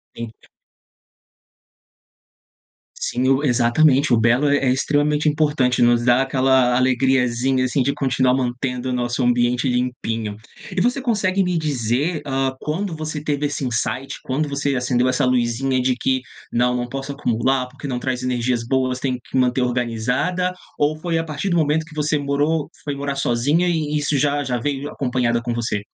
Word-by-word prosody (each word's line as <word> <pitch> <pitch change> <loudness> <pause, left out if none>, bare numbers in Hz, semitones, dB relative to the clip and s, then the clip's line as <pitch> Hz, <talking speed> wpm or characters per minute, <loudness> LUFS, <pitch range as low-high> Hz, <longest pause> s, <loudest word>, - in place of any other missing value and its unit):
Entendi. 115 -1 -9 2.5
Sim, 130 - -1
o 135 +2 +2
exatamente 130 +2 +3
o - - +5
belo 120 +6 +3
é 145 - +4
é 130 - +3
extremamente 145 +3 +1
importante, 145 -5 +2
nos 120 0 +4
dá 125 +1 +4
aquela 130 -2 +2
alegriazinha, 130 0 +2
assim, 130 +2 0
de 140 +2 0
continuar 130 -2 +1
mantendo 125 0 -2
o - - -1
nosso 120 +1 -1
ambiente 120 +1 +2
limpinho. 115 -4 -2 0.3
E - - -2
você 245 +7 +1
consegue 195 -6 +1
me 180 -1 0
dizer, 145 +2 -1
hã, 135 -1 -1
quando 170 +3 -3
você 155 -1 -4
teve 145 -1 -1
esse 145 -1 -3
insight, 125 +3 -2
quando 145 +4 -1
você 140 -1 -1
acendeu 125 0 +1
essa 130 +1 +1
luzinha 125 +1 +1
de 125 0 +1
que: 130 +1 0 0.3
"Não, 125 +1 +2
não 120 0 -2
posso 135 +2 -5
acumular, 130 -1 0
porque 135 +3 -9
não 125 -2 -2
traz 130 -1 -3
energias 125 -1 0
boas, 130 0 0
tenho 130 -2 -2
que - - -10
manter 125 0 +2
organizada."? 125 +9 -1 0.2
Ou 150 +1 +1
foi 165 +1 -2
à 165 - 0
partir 160 +4 -3
do 175 - +2
momento 155 0 +1
que 155 -1 -15
você 150 0 +1
morou 145 +2 0 0.2
foi 145 -1 -2
morar 140 0 -3
sozinha 140 +6 +1
e 155 -3 0
isso 145 0 0
já 145 +1 +1
já 125 -2 -1
veio 140 +2 -2
j 145 - -4
acompanhada 125 -3 0
com 120 0 -3
você? 115 -3 -2
130 Hz, 170 wpm, -21 LUFS, 125-145 Hz, 2.5 s, o